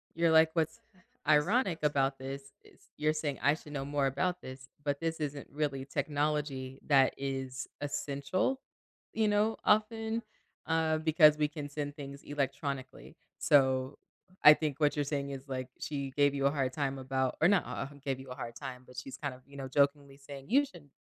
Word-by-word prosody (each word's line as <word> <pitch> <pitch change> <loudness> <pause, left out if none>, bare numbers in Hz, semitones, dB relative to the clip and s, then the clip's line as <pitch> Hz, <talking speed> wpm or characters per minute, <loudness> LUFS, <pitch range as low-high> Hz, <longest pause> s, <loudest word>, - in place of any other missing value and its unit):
You're 165 0 +3
like, 160 0 +6
"What's 160 -2 0 0.5
ironic 170 - +3
about 135 -2 +2
this 135 +1 -7
is - - -22
you're 150 +1 +2
saying 150 -3 -2
I 145 - +4
should 150 -1 -12
know 135 -1 -3
more 145 -1 0
about 180 +7 -1
this, 130 0 -9 0.2
but 145 -1 -1
this 165 0 -2
isn't 145 -2 -4
really 140 -2 -2
technology 145 -2 -2
that 135 -3 +5
is 135 -1 -4
essential, 145 - -1 0.5
you 220 -1 +2
know, 210 +2 +2
often, 220 +1 +2 0.5
uh, 160 -1 +2
because 155 -1 +6
we 150 -1 +2
can 150 -1 -7
send 145 0 -4
things 140 -1 -8
electronically." 140 -1 -4 0.2
So, 130 -1 +3 0.5
I 150 - +12
think 150 -2 -2
what 150 -1 +3
you're 145 -1 0
saying 140 -1 -2
is, 135 0 -7
like, 130 -1 -4
she 140 -2 -3
gave 145 +1 +3
you 140 0 0
a 140 - +5
hard 135 -3 -1
time 135 -2 -1
about 130 0 -1
or 160 - +7
not, 200 0 +4
uh, - - -4 0.2
gave 135 -2 -1
you 135 0 -10
a 125 - -6
hard 115 -3 -6
time, 130 -2 -7
but 125 - -15
she's 130 +1 -6
kind 145 -3 -3
of, 125 - -14
you 140 0 -13
know, 135 -1 -5
jokingly 140 0 +1
saying, 140 +1 -10
"You 280 +5 +5
should 170 - -15
145 Hz, 190 wpm, -32 LUFS, 135-155 Hz, 0.5 s, I